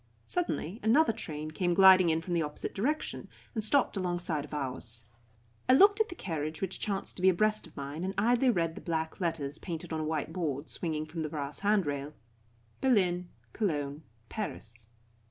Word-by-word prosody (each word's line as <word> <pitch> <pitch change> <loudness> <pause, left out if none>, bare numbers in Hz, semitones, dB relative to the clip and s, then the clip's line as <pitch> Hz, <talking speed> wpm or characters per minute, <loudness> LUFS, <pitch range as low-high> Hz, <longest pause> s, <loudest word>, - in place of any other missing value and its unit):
Suddenly 235 - -2
another 235 +4 +4
train 155 -7 -5
came 175 +2 0
gliding 190 -2 +8
in 160 0 +2
from 175 - -3
the 170 - +2
opposite 150 -1 -4
direction, 290 +10 -2 0.3
and 220 -3 -2
stopped 260 +3 +2
alongside 175 -5 -1
of 150 - -11
ours. 125 -5 -4 0.6
I - - +8
looked 405 +9 +7
at 440 - +1
the 350 - -7
carriage 155 - -3
which 190 -1 -3
chanced 200 -1 -3
to - - -6
be 190 - +6
abreast 215 +2 +2
of 165 - -20
mine, 140 +4 -5
and 190 +1 -2
idly 240 +4 +4
read 165 -7 +1
the - - -9
black 160 -1 -2
letters 155 -4 -1
painted 165 -2 -5
on 160 - -1
a - - -1
white 155 -1 -2
board 155 -5 -2
swinging 155 -3 -3
from 160 +1 -5
the 155 - -2
brass 145 -2 -4
handrail: 150 -9 0 0.7
"BERLIN 180 -9 +2 0.2
COLOGNE 150 -8 -1 0.3
PARIS." 115 - -5
170 Hz, 180 wpm, -31 LUFS, 150-205 Hz, 0.7 s, gliding